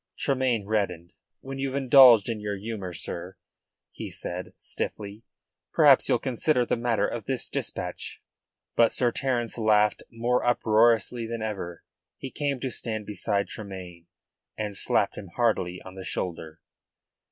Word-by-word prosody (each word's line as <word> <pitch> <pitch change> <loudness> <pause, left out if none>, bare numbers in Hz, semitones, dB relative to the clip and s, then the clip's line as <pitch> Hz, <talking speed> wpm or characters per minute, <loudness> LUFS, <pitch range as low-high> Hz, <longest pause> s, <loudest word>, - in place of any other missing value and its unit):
Tremayne 130 -6 0
reddened. 95 -5 -2 0.3
"When 135 0 -7
you've 135 0 -2
indulged 130 -5 +7
your 105 -3 -3
humour, 100 -3 -5
sir," - - -4 0.5
he - - -7
said 90 +1 -6
stiffly, 105 +2 -5 0.5
"perhaps - - +6
you'll - - +4
consider 125 0 +1
the - - 0
matter 115 -3 +1
of 115 -4 -5
this 130 0 0
dispatch." - - -5 0.6
But 115 -1 +5
Sir 120 -2 +2
Terence 120 -2 -1
laughed 105 -1 +3
more 120 +2 0
uproariously 115 0 +3
than 115 -1 -4
ever. 95 -6 -5 0.3
He 135 - -7
came 140 -3 -2
to 130 - -2
stand 110 -3 -3
beside 100 0 -1
Tremayne, 90 -5 -9 0.5
and 105 -2 -3
slapped - - +1
him 100 - -9
heartily 95 -7 +1
on 95 - -9
the 95 0 -8
shoulder. 80 -4 -5
110 Hz, 140 wpm, -26 LUFS, 100-120 Hz, 0.6 s, indulged